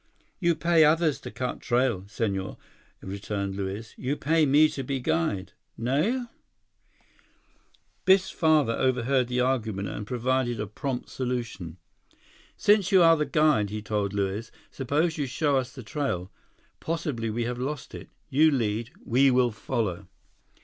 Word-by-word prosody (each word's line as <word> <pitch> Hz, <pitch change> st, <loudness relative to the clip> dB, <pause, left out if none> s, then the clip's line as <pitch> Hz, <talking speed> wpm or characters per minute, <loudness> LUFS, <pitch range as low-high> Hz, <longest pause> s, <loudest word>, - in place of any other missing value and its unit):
"You 170 Hz, -2 st, +2 dB
pay 170 Hz, -1 st, +4 dB
others 155 Hz, -2 st, +3 dB
to -, -, -7 dB
cut 125 Hz, -1 st, -4 dB
trail, 120 Hz, -6 st, +1 dB
Senhor," 100 Hz, -3 st, -3 dB, 0.5 s
returned 100 Hz, 0 st, -4 dB
Luiz. 100 Hz, +3 st, -5 dB
"You 130 Hz, +3 st, -1 dB
pay 160 Hz, +1 st, +2 dB
me 150 Hz, +3 st, +6 dB
to 135 Hz, -, -5 dB
be 135 Hz, +1 st, -2 dB
guide. 95 Hz, -2 st, -1 dB, 0.2 s
Nao?" 155 Hz, -, 0 dB, 1.8 s
Biff's 190 Hz, 0 st, +4 dB
father 155 Hz, -7 st, +3 dB
overheard 130 Hz, 0 st, +1 dB
the 125 Hz, 0 st, 0 dB
argument 110 Hz, -7 st, -1 dB
and 105 Hz, -, -6 dB
provided 125 Hz, -1 st, 0 dB
a 105 Hz, -, -1 dB
prompt 125 Hz, +5 st, -4 dB
solution. 120 Hz, -10 st, -4 dB, 0.8 s
"Since 205 Hz, -2 st, +3 dB
you 190 Hz, -3 st, +6 dB
are 165 Hz, 0 st, +7 dB
the 150 Hz, -1 st, -1 dB
guide," 150 Hz, -10 st, +3 dB
he 105 Hz, +1 st, -5 dB
told 105 Hz, -2 st, -1 dB
Luiz, 100 Hz, +3 st, -2 dB, 0.2 s
"suppose 155 Hz, +5 st, 0 dB
you 140 Hz, -, -1 dB
show 140 Hz, +2 st, +1 dB
us 130 Hz, -1 st, -2 dB
the 130 Hz, -, -10 dB
trail. 105 Hz, -, -3 dB, 0.5 s
Possibly 150 Hz, -9 st, -2 dB
we 115 Hz, +2 st, -2 dB
have 120 Hz, +1 st, -3 dB
lost 140 Hz, +2 st, -4 dB
it. -, -, -9 dB, 0.2 s
You 155 Hz, +4 st, +4 dB
lead; 115 Hz, -4 st, -1 dB, 0.2 s
we 135 Hz, +3 st, +4 dB
will 125 Hz, -1 st, +3 dB
follow." 100 Hz, -4 st, -3 dB
125 Hz, 145 wpm, -27 LUFS, 105-150 Hz, 1.8 s, are